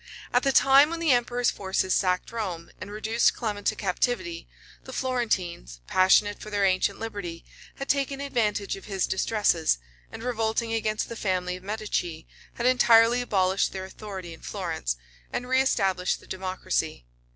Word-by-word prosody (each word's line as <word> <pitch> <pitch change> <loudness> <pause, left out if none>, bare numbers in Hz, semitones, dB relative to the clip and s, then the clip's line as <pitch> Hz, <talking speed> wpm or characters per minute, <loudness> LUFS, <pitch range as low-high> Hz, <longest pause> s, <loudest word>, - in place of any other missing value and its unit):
At 245 - +4
the 275 - +2
time 275 +2 +6
when 335 0 -4
the 330 -3 +2
emperor's 245 0 +2
forces 190 -1 -1
sacked 180 -1 +1
Rome, 185 -8 -4
and 185 - -6
reduced 220 +2 +2
Clement 210 -4 -3
to - - +2
captivity, 185 -3 -1 0.4
the 260 - -9
Florentines, 190 - -2
passionate 195 - +4
for 215 - -8
their 205 -1 +1
ancient 185 -1 +1
liberty, 200 -7 -6 0.3
had 275 - -6
taken 275 -1 0
advantage 220 -7 -1
of 195 - -11
his 195 -3 -1
distresses, 190 - +1 0.3
and 225 - -8
revolting 225 -1 -1
against 215 -1 -1
the 230 - -7
family 185 -4 -1
of 180 - -10
Medicis, 195 -6 -3 0.3
had 235 - -3
entirely 240 -1 +5
abolished 190 -5 +1
their 190 -1 -5
authority 190 -3 -8
in 165 - -14
Florence, - - -3 0.3
and 245 - -3
reëstablished 195 -8 +1
the - - -18
democracy. 185 - -3
210 Hz, 155 wpm, -26 LUFS, 185-240 Hz, 0.4 s, time